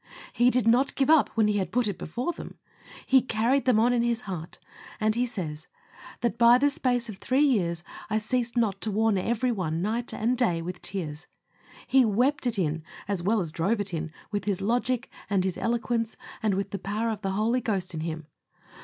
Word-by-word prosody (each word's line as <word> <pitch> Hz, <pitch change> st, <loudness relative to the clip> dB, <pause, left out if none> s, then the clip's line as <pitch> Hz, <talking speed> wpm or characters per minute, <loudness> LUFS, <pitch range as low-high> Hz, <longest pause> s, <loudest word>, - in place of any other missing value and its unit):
He 240 Hz, +1 st, +4 dB
did 250 Hz, -3 st, +1 dB
not 250 Hz, +4 st, +3 dB
give 275 Hz, +2 st, +3 dB
up 320 Hz, -2 st, +5 dB
when 220 Hz, -1 st, +4 dB
he 205 Hz, -1 st, +1 dB
had 185 Hz, -3 st, -3 dB
put 245 Hz, -2 st, +1 dB
it 200 Hz, -, -4 dB
before 245 Hz, -, -3 dB
them. -, -, -10 dB, 0.5 s
He 265 Hz, -1 st, +5 dB
carried 240 Hz, +3 st, +1 dB
them 250 Hz, -4 st, +4 dB
on 235 Hz, +2 st, +4 dB
his 235 Hz, 0 st, 0 dB
heart, 180 Hz, -7 st, -6 dB, 0.4 s
and 215 Hz, 0 st, +2 dB
he 245 Hz, +2 st, 0 dB
says, 160 Hz, -8 st, -5 dB, 0.5 s
"That 235 Hz, -1 st, -1 dB
by 235 Hz, +1 st, +7 dB
the 285 Hz, +2 st, +3 dB
space 245 Hz, -3 st, 0 dB
of 215 Hz, -4 st, -7 dB
three 260 Hz, +4 st, +2 dB
years 175 Hz, -, +1 dB, 0.3 s
I 215 Hz, -, +1 dB
ceased 235 Hz, +2 st, -1 dB
not 205 Hz, -5 st, +1 dB
to 220 Hz, -, -1 dB
warn 215 Hz, -1 st, +2 dB
every 235 Hz, +5 st, 0 dB
one 170 Hz, -7 st, -2 dB
night 225 Hz, +6 st, -1 dB
and 235 Hz, +4 st, 0 dB
day 230 Hz, -10 st, +1 dB
with 180 Hz, +2 st, -6 dB
tears." 160 Hz, -6 st, -4 dB, 0.6 s
He 265 Hz, -1 st, +5 dB
wept 245 Hz, +6 st, +2 dB
it 235 Hz, -3 st, 0 dB
in, 160 Hz, -3 st, 0 dB, 0.3 s
as 200 Hz, -3 st, -1 dB
well 210 Hz, +5 st, +2 dB
as 165 Hz, -4 st, -4 dB
drove 195 Hz, +8 st, 0 dB
it 200 Hz, -2 st, -3 dB
in, 160 Hz, -1 st, -3 dB, 0.2 s
with 205 Hz, -1 st, -2 dB
his 200 Hz, -3 st, 0 dB
logic, 240 Hz, +4 st, 0 dB, 0.2 s
and 195 Hz, -2 st, +2 dB
his 185 Hz, -1 st, -1 dB
eloquence, 230 Hz, -1 st, -1 dB, 0.2 s
and 210 Hz, -3 st, +1 dB
with 195 Hz, 0 st, -2 dB
the 200 Hz, -, -3 dB
power 215 Hz, +5 st, -1 dB
of 210 Hz, -2 st, -5 dB
the 195 Hz, -1 st, -2 dB
Holy 225 Hz, +5 st, +1 dB
Ghost 190 Hz, -6 st, -2 dB
in 160 Hz, -, -4 dB
him. 160 Hz, 0 st, -4 dB
220 Hz, 210 wpm, -27 LUFS, 190-240 Hz, 0.6 s, by